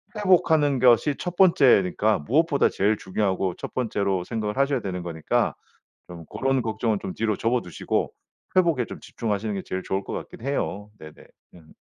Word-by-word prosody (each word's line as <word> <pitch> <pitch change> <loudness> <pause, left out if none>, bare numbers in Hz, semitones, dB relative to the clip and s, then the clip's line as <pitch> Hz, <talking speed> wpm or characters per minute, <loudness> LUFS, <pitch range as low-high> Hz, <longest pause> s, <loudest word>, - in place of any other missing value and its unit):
회복하는 160 -8 +3
것이 125 +4 +4
1 180 0 -5
번째니까 110 - +4
무엇보다 145 - +2
제일 105 +2 +1
중요하고 95 -2 -1
1 - - -7
번째로 100 -7 -1
생각을 110 0 -3
하셔야 140 0 +1
되는 90 -2 -4
거니까 80 -3 -1 0.5
좀 85 -2 -10
고런 135 - -1
걱정은 110 -1 -1
좀 95 - -4
뒤로 110 -2 -1
접어 120 +4 0
두시고 90 -5 -3 0.4
회복에 165 -10 +3
좀 - - -9
집중하시는 105 -1 -3
게 95 - -3
제일 95 0 -4
좋을 95 +1 -2
것 - - -6
같긴 - - -8
해요. 110 -6 -3
네네. 80 0 -12 0.3
음. 80 -3 -17
110 Hz, 355 characters per minute, -24 LUFS, 95-135 Hz, 0.5 s, 것이